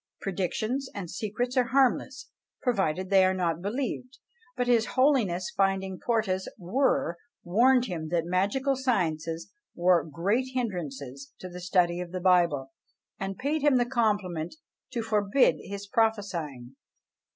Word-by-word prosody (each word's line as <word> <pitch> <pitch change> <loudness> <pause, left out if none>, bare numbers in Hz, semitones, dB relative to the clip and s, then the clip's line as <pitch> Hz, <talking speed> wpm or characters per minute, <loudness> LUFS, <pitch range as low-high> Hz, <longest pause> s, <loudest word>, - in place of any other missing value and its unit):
Predictions 215 +8 -2
and 185 -5 -5
secrets 225 +6 -3
are 255 -2 +4
harmless, 260 +1 +1 0.3
provided 190 - 0
they 190 -1 +6
are 185 0 +3
not 170 -3 -1
believed: 250 +4 -3 0.4
but 245 - +1
his 235 -2 +3
Holiness 230 -10 +2
finding 195 -1 0
Porta's 215 -6 0
were, 185 -3 0 0.2
warned 245 +7 +4
him 165 -7 -4
that 170 -1 0
magical 200 +10 +1
sciences 165 -10 -1 0.2
were 175 -1 +4
great 195 - 0
hindrances 140 - -4
to 185 - -8
the 180 0 -9
study 175 -1 +2
of 180 -1 -5
the 185 - -2
Bible, 170 -7 +3 0.5
and 195 0 -4
paid 295 +3 -1
him 285 -2 +4
the 245 - +2
compliment 205 - -1 0.3
to 240 -3 -3
forbid 215 +3 +3
his 200 +1 -7
prophesying. 185 - -1
195 Hz, 135 wpm, -28 LUFS, 175-245 Hz, 0.5 s, they